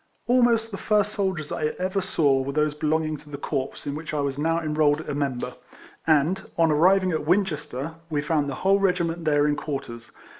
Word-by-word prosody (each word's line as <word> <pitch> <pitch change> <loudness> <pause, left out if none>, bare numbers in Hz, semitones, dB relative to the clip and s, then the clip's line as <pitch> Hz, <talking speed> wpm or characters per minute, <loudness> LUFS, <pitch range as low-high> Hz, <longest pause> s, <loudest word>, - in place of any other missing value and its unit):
Almost 235 -2 +3
the 195 - -6
first 210 -1 +1
soldiers 190 -7 -2
I 150 0 -1
ever 185 +2 -1
saw 150 -8 +2
were 140 +1 -4
those 150 0 +1
belonging 155 +1 0
to 150 - -16
the 145 - -6
corps 135 -2 -4
in 140 - -3
which 155 +1 -5
I - - 0
was 140 -1 -2
now 165 +2 +1
enrolled 155 -1 +1
a 160 - -5
member, 140 -3 -2 0.5
and, 160 +5 +3 0.2
on 165 -1 +4
arriving 185 +5 +4
at 155 -2 -2
Winchester, 165 -6 0 0.2
we 150 -2 0
found 150 -2 0
the 135 - -4
whole 195 +1 +5
regiment 175 -3 0
there 145 -1 +3
in 145 - +1
quarters. 135 -6 -6
155 Hz, 195 wpm, -25 LUFS, 145-185 Hz, 0.5 s, whole